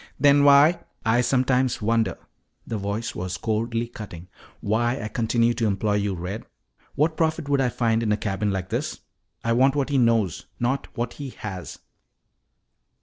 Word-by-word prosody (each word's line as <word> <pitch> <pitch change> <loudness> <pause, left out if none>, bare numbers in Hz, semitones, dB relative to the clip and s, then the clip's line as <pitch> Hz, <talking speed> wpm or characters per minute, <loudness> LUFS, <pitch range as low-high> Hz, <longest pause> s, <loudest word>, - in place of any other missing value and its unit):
"Then 140 +1 +5
why 145 +4 +6
" - - -36
"I 120 - +4
sometimes 130 0 +2
wonder," 115 -2 +1 0.5
the 110 - -3
voice 100 +3 -3
was 90 0 -4
coldly 115 +4 -1
cutting, 90 -7 -10 0.3
"why 120 +5 0
I 110 - -4
continue 115 +1 +1
to 115 -1 0
employ 105 +1 0
you, 100 -2 -1
Red. 90 +5 -5 0.5
What 155 +2 +2
profit 160 -2 0
would 140 -1 +2
I 130 - +2
find 115 -2 +1
in 110 -2 0
a 105 - +2
cabin 105 0 -1
like 95 -2 -3
this? - - -3 0.4
I 115 - +1
want 130 +3 +4
what 140 -1 0
he 140 -2 +2
knows, 115 -7 +1
not 130 +3 -1
what 120 0 -2
he 140 -2 -7
has." 95 -7 -7
115 Hz, 170 wpm, -24 LUFS, 105-130 Hz, 0.5 s, why